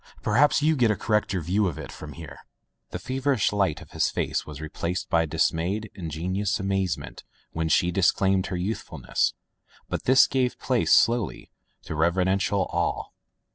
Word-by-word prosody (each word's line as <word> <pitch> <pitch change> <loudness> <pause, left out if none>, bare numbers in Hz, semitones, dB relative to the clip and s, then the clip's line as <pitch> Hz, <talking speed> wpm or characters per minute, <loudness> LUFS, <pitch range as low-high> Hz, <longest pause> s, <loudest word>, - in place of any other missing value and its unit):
Perhaps 145 +7 +3
you 155 +1 +3
get 120 -5 +3
a 105 - +2
correcter 105 -3 0
view 95 +5 +1
of 85 - -4
it - - -7
from 75 -1 -9
here.'' 80 -5 -10 0.5
The - - -5
feverish 130 +2 0
light 95 -7 0
of - - -19
his - - +1
face - - -2
was 75 -2 -8
replaced 85 +3 -4
by 80 -1 +3
dismayed, 85 +7 -1
ingenuous 95 +4 -2
amazement 95 -10 -2 0.3
when 80 0 -2
she 90 +3 +3
disclaimed 95 +1 +2
her 95 - -3
youthfulness, 95 +6 -2 0.5
but - - -3
this 130 +1 +7
gave 130 -2 0
place, 125 -3 0
slowly, 115 -5 +2 0.3
to - - -6
reverential 95 +4 +1
awe. 85 0 -1
95 Hz, 155 wpm, -25 LUFS, 85-105 Hz, 0.5 s, this